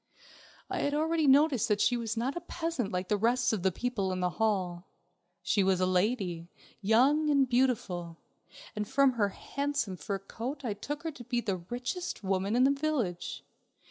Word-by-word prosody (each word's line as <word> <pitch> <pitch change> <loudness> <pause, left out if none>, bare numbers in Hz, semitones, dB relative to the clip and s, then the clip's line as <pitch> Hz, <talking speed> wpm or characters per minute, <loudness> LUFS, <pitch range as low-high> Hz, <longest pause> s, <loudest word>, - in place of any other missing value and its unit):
I - - -3
had 285 0 0
already 320 0 +1
noticed 275 -3 +5
that 210 -1 +1
she 245 - +3
was 230 -1 -3
not 255 +6 -1
a 345 - -4
peasant 330 - -3
like 180 0 -2
the 210 - +1
rest 235 +3 +2
of 210 - -1
the 190 +1 +2
people 205 -2 -2
in 185 - -2
the 180 0 0
hall. 185 -5 0 0.6
She 200 - +2
was 190 -1 +2
a 185 - +3
lady, 185 -3 0 0.3
young 265 +9 +4
and 280 -2 +4
beautiful, 215 -10 0 0.6
and 210 -1 -2
from 275 +2 +4
her 215 -5 +1
handsome 280 -4 -3
fur 195 +6 -3
coat 250 +8 -6
I 220 - 0
took 285 +9 -6
her 325 - -2
to 250 -5 -11
be 240 0 -1
the 200 -5 -1
richest 245 - -5
woman 195 +2 0
in 250 - +4
the 270 - +5
village. 275 - -2
230 Hz, 185 wpm, -30 LUFS, 190-275 Hz, 0.6 s, noticed